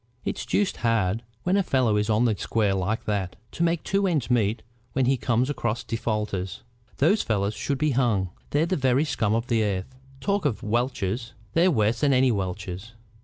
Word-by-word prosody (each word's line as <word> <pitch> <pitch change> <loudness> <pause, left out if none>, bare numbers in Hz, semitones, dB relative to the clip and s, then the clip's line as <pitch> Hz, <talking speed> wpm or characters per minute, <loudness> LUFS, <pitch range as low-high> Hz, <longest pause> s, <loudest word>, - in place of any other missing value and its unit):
It's - - -3
deuced 205 -2 +1
hard, 115 -3 +1 0.2
when 180 +2 +2
a 200 - +4
fellow 130 - +2
is 105 +1 0
on 110 +3 +3
the 110 -3 +2
square 105 +2 0
like 95 +4 -1
that, 100 -3 -2 0.2
to - - -6
make 170 -1 +1
two 195 0 +1
ends 150 -9 0
meet 110 -2 +1 0.3
when 130 -1 +2
he 135 +2 +3
comes 120 +1 +1
across 120 -5 -2
defaulters. 105 -5 -3 0.3
Those 185 +10 +3
fellows 100 -2 0
should 135 +6 -2
be 150 +2 +1
hung. 115 -8 +1 0.2
They're 150 +3 +2
the 185 +2 0
very 130 0 +2
scum 110 -7 0
of 115 +1 0
the 115 -3 +1
earth. 100 +3 -2 0.3
Talk 200 +5 0
of 140 -8 -1
welchers! 115 -1 -1 0.2
They're 170 +3 +4
worse 115 - +2
than 140 -2 +3
any 130 0 +4
welcher. 95 -3 -3
115 Hz, 190 wpm, -25 LUFS, 105-140 Hz, 0.3 s, a